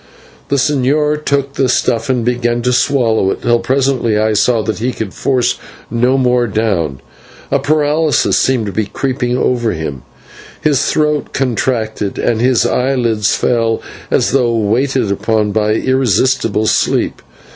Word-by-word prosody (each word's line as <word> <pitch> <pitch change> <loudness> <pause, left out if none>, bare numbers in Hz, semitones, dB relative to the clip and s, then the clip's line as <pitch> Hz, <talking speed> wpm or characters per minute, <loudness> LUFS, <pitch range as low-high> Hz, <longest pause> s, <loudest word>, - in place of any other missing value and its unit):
The 140 - +1
señor 150 +2 +1
took 140 -1 -1
the 135 -2 0
stuff 115 -1 0
and 125 -3 0
began 120 -1 0
to 125 +1 +1
swallow 120 -5 +2
it, - - -4
till 120 0 +2
presently 130 -2 0
I 110 0 +1
saw 110 +2 +2
that 110 +1 -3
he 125 +3 -1
could 110 -4 -5
force 125 -2 0 0.3
no 125 +3 +2
more 125 -2 +2
down, 95 -11 -1 0.5
for - - 0
a - - -4
paralysis 155 +1 +1
seemed 130 -4 +1
to 100 - -4
be 110 0 -2
creeping 125 +1 -2
over 120 -3 0
him; 75 -4 -5 0.6
his 145 -4 +1
throat 150 -1 0
contracted, 115 -5 -2
and 115 -1 0
his 125 -2 +2
eyelids 120 -5 +1
fell 115 -2 0 0.3
as - - +1
though 125 -3 +2
weighed 115 +6 0
upon 105 -1 0
by 105 0 +1
irresistible 130 -3 +1
sleep. - - 0
120 Hz, 150 wpm, -15 LUFS, 110-130 Hz, 0.6 s, swallow